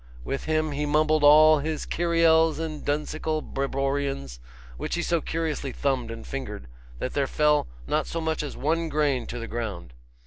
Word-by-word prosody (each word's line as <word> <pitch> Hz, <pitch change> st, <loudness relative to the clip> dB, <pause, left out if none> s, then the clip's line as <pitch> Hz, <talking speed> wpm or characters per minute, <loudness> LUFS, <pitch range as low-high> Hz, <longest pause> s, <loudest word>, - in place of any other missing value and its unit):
With 135 Hz, -, -4 dB
him 155 Hz, -1 st, 0 dB
he 145 Hz, +1 st, -2 dB
mumbled 155 Hz, +1 st, +2 dB
all 155 Hz, +1 st, +8 dB
his 155 Hz, +1 st, -3 dB
kiriels 165 Hz, -1 st, +3 dB
and 155 Hz, -2 st, -5 dB
dunsical 155 Hz, +1 st, -2 dB
breborions, 135 Hz, -, -2 dB, 0.4 s
which -, -, -3 dB
he 175 Hz, -, -1 dB
so 170 Hz, -1 st, +1 dB
curiously 160 Hz, -4 st, -2 dB
thumbed 130 Hz, -4 st, -1 dB
and 115 Hz, 0 st, -7 dB
fingered, 105 Hz, -, -6 dB, 0.3 s
that 125 Hz, -, -4 dB
there 140 Hz, -2 st, +1 dB
fell 150 Hz, -, +2 dB, 0.2 s
not -, -, 0 dB
so 165 Hz, -, -3 dB
much 160 Hz, -1 st, -1 dB
as 150 Hz, -, -6 dB
one 165 Hz, +3 st, 0 dB
grain 145 Hz, -6 st, 0 dB
to -, -, -5 dB
the 115 Hz, -, -5 dB
ground. 100 Hz, -, -5 dB
150 Hz, 170 wpm, -26 LUFS, 135-155 Hz, 0.4 s, all